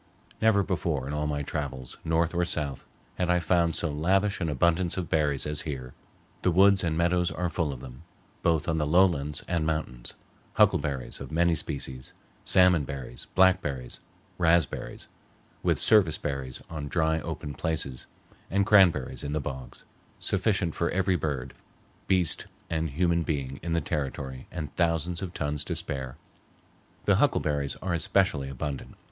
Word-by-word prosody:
Never 110 -2 +4
before 85 -8 -1
in 75 - -4
all 75 0 -1
my 75 -1 -2
travels, 70 -4 -5
north 80 +1 +1
or 90 0 +1
south, 75 -5 -3 0.3
had 90 -1 +1
I 90 - +4
found 85 -1 +2
so 85 - -1
lavish 95 +7 +1
an 85 - 0
abundance 85 +5 +1
of 90 -3 -3
berries 75 -3 +1
as 75 0 -1
here. 65 -5 -6 0.5
The - - +2
woods 95 +2 +5
and 80 -2 0
meadows 85 +1 +2
are 90 -1 -2
full 85 -6 0
of 65 -3 -8
them, 65 0 -10 0.4
both 80 -4 +1
on 80 -1 +1
the 75 - 0
lowlands 75 -4 +2
and 85 -2 0
mountains—huckleberries 70 -2 -1
of 70 - -7
many 85 +2 +3
species, 65 -5 -4 0.3
salmon 90 -4 +5
berries, 65 -3 -7
blackberries, 90 -10 +2 0.4
raspberries, 85 -2 +1 0.5
with - - +1
service 100 -8 +4
berries 65 -3 -4
on 75 -3 -5
dry 80 +1 +1
open 75 -3 -5
places, 70 -4 -2 0.4
and 100 +1 +2
cranberries 95 -10 +4
in 70 - -3
the 75 - 0
bogs, 65 -3 -7 0.4
sufficient 95 -4 0
for 85 - 0
every 95 0 +1
bird, 70 -6 -3 0.5
beast, 90 -3 +2 0.2
and 80 0 0
human 85 +4 +1
being 70 -4 -3
in 85 +1 -2
the 85 - +2
territory 65 -2 -4
and 75 -5 -6
thousands 85 0 0
of 95 -2 -4
tons 75 -1 -2
to - - -3
spare. 65 -2 -4 0.9
The - - +4
huckleberries 70 -2 +1
are 90 -2 -1
especially 90 -6 +1
abundant. 70 +1 -5
80 Hz, 155 wpm, -28 LUFS, 70-90 Hz, 0.9 s, woods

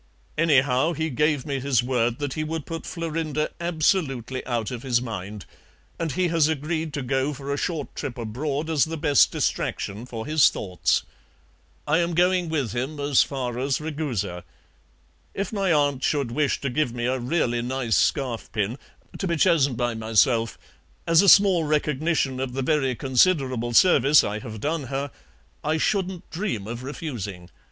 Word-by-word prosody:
Anyhow, 145 -1 +3
he 160 0 -2
gave 150 0 +1
me 140 -3 -2
his 130 -3 +1
word 120 -2 0
that 145 -2 -3
he 155 - -2
would 160 -1 -4
put 165 -1 -6
Florinda 160 -3 -2
absolutely 155 - 0
out 120 -3 -2
of 120 -2 -5
his 125 -2 +1
mind, 105 -4 -6 0.5
and 160 -4 -2
he 180 +4 +1
has 165 -2 +3
agreed 160 +1 -2
to 145 - -3
go 135 +3 0
for 140 +1 -4
a - - 0
short 155 -2 -3
trip 125 -3 -5
abroad 135 +7 -3
as 160 -4 +2
the 165 +1 -5
best 145 -2 +4
distraction 105 +5 -2
for 115 -3 -6
his 155 -1 +5
thoughts. 90 -2 -1 0.8
I 150 +3 +2
am 170 -1 0
going 180 0 +2
with 145 -8 -1
him 130 +5 -3
as 140 -2 +3
far 125 -3 -2
as 135 0 0
Ragusa. 145 - -3 0.9
If 200 +2 -3
my 195 -3 +1
aunt 145 -3 +2
should 140 -6 0
wish 145 +1 0
to 140 - -2
give 125 -3 0
me 120 0 -2
a 130 +1 0
really 120 -2 0
nice 125 -2 -1
scarf 130 -5 0
pin 110 +3 -2 0.4
(to 195 - -1
be 170 - 0
chosen 150 -6 +3
by 120 0 -1
myself), 115 +1 +2 0.5
as 165 +1 +5
a 200 - +5
small 195 -4 +6
recognition 150 -2 0
of 130 -1 -3
the 135 +1 -2
very 135 -3 +1
considerable 130 -2 +1
service 145 -1 +6
I 105 +1 -3
have 110 -2 -8
done 150 +4 -2
her, 135 +2 -3 0.5
I 155 +1 +1
shouldn't 190 0 -1
dream 165 - -3
of 120 +2 -6
refusing. 105 - -6
140 Hz, 170 wpm, -24 LUFS, 120-160 Hz, 0.9 s, small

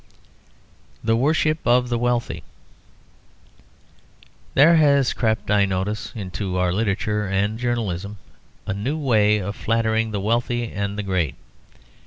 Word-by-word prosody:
THE 115 0 +2
WORSHIP 155 +5 +1
OF 125 0 +3
THE 120 -1 0
WEALTHY 120 -1 -1 2.1
There 160 +5 +6
has 140 -4 +4
crept, 110 -3 -1
I 100 -1 +4
notice, 95 +3 -3
into 95 -2 -4
our 90 -1 +1
literature 105 0 -1
and 100 +3 -1
journalism 105 -5 -2 0.5
a - - -2
new 120 +10 -2
way 110 -8 +3
of 100 0 -4
flattering 110 0 0
the 105 -2 -3
wealthy 120 +3 -1
and 100 0 -3
the 105 - -2
great. 90 -8 -1
110 Hz, 125 wpm, -22 LUFS, 100-120 Hz, 2.1 s, There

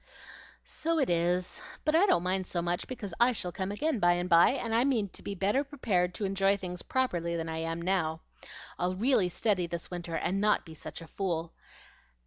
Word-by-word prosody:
"So 330 +1 -2
it 275 - +2
is; 175 - 0 0.2
but 305 - +2
I 370 +5 +5
don't 175 - +3
mind 185 0 -1
so 175 - -2
much, 175 +1 -1
because 210 -8 -6
I 245 +1 +5
shall 180 -5 -4
come 190 +2 -3
again 285 +4 0
by 175 -2 +5
and 175 +1 -1
by, 170 -1 +6
and 235 -4 -3
I 230 +2 +4
mean 235 -7 +1
to - - -14
be 200 - -5
better 205 +9 +1
prepared 205 -11 0
to 210 - -2
enjoy 195 +1 +2
things 180 -2 -6
properly 175 -10 -1
than 165 0 -3
I 160 0 -3
am 165 +1 -2
now. 165 -3 0 0.6
I'll 180 +1 0
really 210 -3 +3
study 185 -1 0
this 170 +1 -6
winter, 175 -2 -4
and 195 +4 0
not 210 0 +2
be 160 - -10
such 160 - -8
a 165 - -10
fool. 170 -2 -3
185 Hz, 210 wpm, -30 LUFS, 175-220 Hz, 0.6 s, by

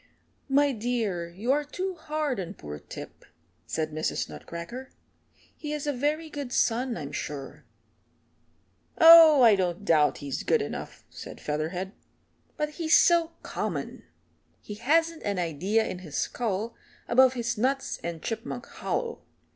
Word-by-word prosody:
"My 285 +1 +4
dear, 215 -8 -2
you 205 +9 -2
are 295 +2 +2
too 370 +6 -4
hard 305 - -2
on 185 +1 -5
poor 75 0 -8
Tip," - - -10 0.4
said 155 -1 -2
Mrs. 155 +1 -2
Nutcracker. 205 +11 -8 0.7
"He 300 -1 -5
is 300 -1 -3
a 290 - 0
very 300 +5 -1
good 285 -4 -6
son, 245 0 +1
I'm 145 -1 -6
sure." 145 -2 -6 1.3
"Oh, 325 -5 +9
I 225 -3 +8
don't 185 +1 -2
doubt 155 -5 +3
he's 140 -2 -4
good - - +2
enough," - - -7
said - - -9
Featherhead, 165 +6 -3 0.7
"but 300 -1 -1
he's 315 +1 +3
so 335 -1 +4
common. - - -4 0.6
He 210 - -8
hasn't 320 +9 +1
an 200 -2 -2
idea 180 +6 0
in 180 - -5
his 160 -6 -7
skull 225 -1 -2 0.3
above 260 +1 +5
his 240 0 -1
nuts 265 +5 -1
and 170 -1 -5
Chipmunk 230 +2 -4
Hollow. 470 -1 -4
235 Hz, 140 wpm, -27 LUFS, 180-295 Hz, 1.3 s, Oh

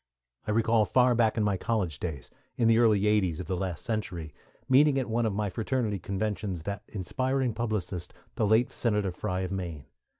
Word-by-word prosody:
I - - -3
recall 115 +1 +3
far 125 +3 +4
back 115 -2 +2
in 110 - +2
my 100 -2 +1
college 95 -8 -1
days, 75 -7 -5 0.3
in 115 - +3
the 115 0 +5
early 110 -4 +4
'80's 105 -6 +2
of 90 - -4
the 95 - -2
last 90 0 -4
century, 90 - -3 0.3
meeting 140 +2 +5
at 130 - 0
one 115 0 +1
of 105 - -1
my 105 0 0
fraternity 115 -2 -1
conventions 100 -2 -3
that 100 +3 -4
inspiring 130 +5 -1
publicist, 100 -6 -3 0.2
the 110 - 0
late 110 +4 +3
Senator 105 -5 0
Frye 90 +1 -3
of 95 -1 -3
Maine. 85 -7 -4
105 Hz, 190 wpm, -28 LUFS, 95-115 Hz, 0.3 s, the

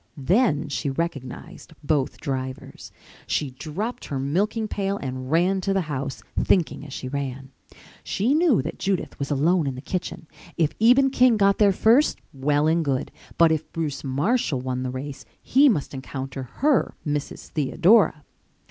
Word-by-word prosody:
Then 160 - +2
she 145 0 -2
recognized 165 +3 -5
both 145 -3 0
drivers. 130 -1 -5 0.4
She 145 -3 -1
dropped 170 - -5
her 140 - -4
milking 200 - 0
pail 200 -1 -2
and 130 -3 -5
ran 180 +5 +2
to 195 +1 0
the 195 - +2
house, 135 -8 -5 0.2
thinking 170 -6 +1
as 145 - -10
she 130 - -6
ran. 135 -1 -5 0.5
She 225 +9 0
knew 310 - +3
that 160 - -6
Judith 195 -2 -2
was 140 - -3
alone 155 +3 +2
in 135 - -2
the - - -7
kitchen. 175 +3 -5 0.3
If 155 -2 +1
Eben 260 +4 +5
King 250 -3 +4
got 200 -1 +3
there 205 -2 +6
first, 230 +9 +3 0.2
well 145 +2 +1
and 165 +1 +2
good, 135 -3 -1 0.3
but 165 -1 +5
if 160 -1 -2
Bruce 155 -4 -3
Marshall 145 - 0
won 130 0 -3
the 130 - -2
race 135 +2 -6 0.2
he 280 +3 +4
must 155 - -1
encounter 130 -1 -6
her, 290 -5 +3
Mrs. 145 -1 -4
Theodora. 160 - +3
155 Hz, 160 wpm, -24 LUFS, 135-195 Hz, 0.5 s, there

